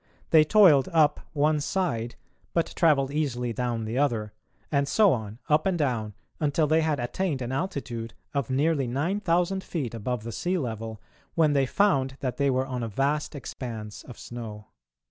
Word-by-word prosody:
They 160 -2 +8
toiled 155 -4 +6
up 155 -3 +4
one 150 +1 +2
side 140 -10 -1 0.4
but 170 - +1
travelled 140 -5 +3
easily 125 -6 -1
down 120 -1 -2
the 115 +4 -2
other, 115 -7 0 0.4
and 140 -1 +2
so 205 +3 +5
on, 110 -3 -5
up 155 +3 +3
and 185 -2 +1
down, 115 - -1 0.2
until 150 +1 +2
they 160 +2 +3
had 155 -3 0
attained 140 +5 -1
an 125 -1 -4
altitude 130 - -4 0.2
of 140 -4 -1
nearly 140 0 +1
9000 180 - 0
feet 140 -10 -4
above 115 +1 -3
the 115 - -5
sea 180 - -1
level, 115 -6 -4 0.4
when 155 -3 +4
they 135 -2 +2
found 135 -8 +2
that 125 -3 -3
they 140 -1 +2
were 130 0 +1
on 130 -2 -4
a 115 - -2
vast 140 +8 -1
expanse 110 -5 -7
of 125 - -12
snow. 110 -3 -8
135 Hz, 170 wpm, -27 LUFS, 120-155 Hz, 0.4 s, They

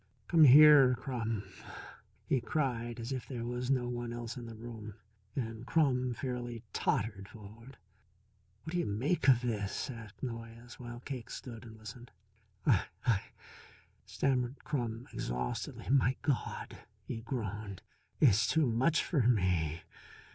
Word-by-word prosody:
"Come 165 -2 +7
here, 140 -2 +9
Crum," 115 -5 -3 0.8
he 130 - +1
cried 120 -6 -1
as 115 +3 -5
if 130 -2 -4
there 120 -3 -4
was 125 +1 -3
no 130 -3 +2
one 120 -1 -3
else 120 0 -5
in 120 -2 -7
the 115 - -8
room. 110 -2 -8 0.4
And 115 -3 -3
Crum 125 -4 +2
fairly 120 -2 -4
tottered 100 -2 -1
forward. 115 +4 -13 0.9
"What 160 - -6
do 175 - 0
you - - 0
make 135 - 0
of 125 -2 +6
this?" 110 +2 -2
asked 115 -2 -11
Noyes, 115 0 -7
while 120 -1 -8
Cake 125 -3 -6
stood 120 -3 -8
and 110 -1 -11
listened. 110 +3 -10 0.6
"I 110 -10 +4 0.2
I 115 -5 +3 0.5
" - - -28
stammered 130 -1 0
Crum 120 -5 -3
exhaustedly. 60 0 -3
"My 130 -1 +4
God," 140 -5 -2 0.3
he - - -4
groaned, 110 -5 -5 0.4
"it's 110 -6 +5
too 160 -2 +3
much 130 +8 +2
for 150 -6 +1
me. 90 -8 +1
120 Hz, 140 wpm, -33 LUFS, 110-130 Hz, 0.9 s, here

